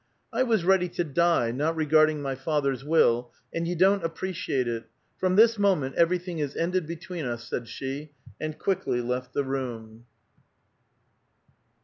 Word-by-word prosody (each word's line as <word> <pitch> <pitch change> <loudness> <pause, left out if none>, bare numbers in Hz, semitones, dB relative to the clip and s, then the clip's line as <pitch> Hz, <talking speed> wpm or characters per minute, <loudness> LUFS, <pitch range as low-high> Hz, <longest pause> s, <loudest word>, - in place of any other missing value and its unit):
" - - -38
I - - +1
was 225 -8 +2
ready 185 -1 +3
to 175 - +2
die, 165 -5 +2
not 150 +6 0
regarding 155 -1 +3
my 135 -1 -1
father's 135 -1 -1
will, 125 -6 +3 0.2
and 165 0 -2
you 175 - -1
don't 190 +2 +4
appreciate 165 -6 -2
it. 115 -1 -3 0.3
From 185 0 +1
this 225 +1 +5
moment 180 -10 +2
everything 175 0 +1
is 145 -2 -3
ended 180 -1 0
between 170 0 -6
us," 120 -1 -4
said 120 -1 -4
she, 140 +5 -6 0.3
and 155 0 -4
quickly 190 -10 0
left 125 +1 -3
the 140 - +2
room. 120 -4 -5
155 Hz, 155 wpm, -27 LUFS, 130-180 Hz, 0.3 s, this